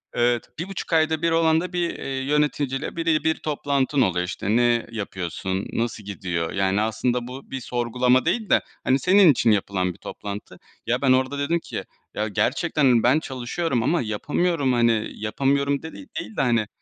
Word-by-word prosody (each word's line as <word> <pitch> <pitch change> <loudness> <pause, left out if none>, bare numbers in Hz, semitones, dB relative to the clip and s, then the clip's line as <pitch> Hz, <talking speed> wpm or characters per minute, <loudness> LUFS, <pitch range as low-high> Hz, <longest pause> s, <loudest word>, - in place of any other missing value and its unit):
Evet, 120 0 +1
1.5 185 0 -5
ayda 160 -1 +2
1 170 - +2
olan 165 -1 +3
da 180 0 -6
bir, 175 -1 0
eee, - - -7 0.2
yöneticiyle 145 -1 0
bire 165 -2 +1
bir 160 0 +2
toplantın 140 -2 0
oluyor, 90 -5 +1
işte, 100 +3 -2
ne 120 -1 +3
yapıyorsun, 95 -2 -4
nasıl 115 -2 -2
gidiyor? 90 -4 -3
Yani 95 +1 +1
aslında 120 +2 -1
bu 130 +2 -10
bir 135 - -3
sorgulama 125 +1 +1
değil 220 -4 0
de, - - +5 0.2
hani, 130 +2 +2
senin 185 +1 +6
için 120 -4 +2
yapılan 95 -3 0
bir - - -19
toplantı. 100 0 -8 0.3
Ya 120 +2 0
ben 135 -2 +3
orada 130 +2 +2
dedim 160 +4 +1
ki - - -6 0.3
ya 105 - -1
gerçekten 140 - 0
hani, 120 -3 +4
ben 130 +6 +4
çalışıyorum 130 0 -2
ama 170 +8 +2
yapamıyorum 140 +6 0
hani 115 -2 +2
yapamıyorum 140 +6 0
de 160 - -7
değil 290 -4 -8
de - - +2
hani 115 -4 +2
130 Hz, 175 wpm, -24 LUFS, 110-155 Hz, 0.3 s, senin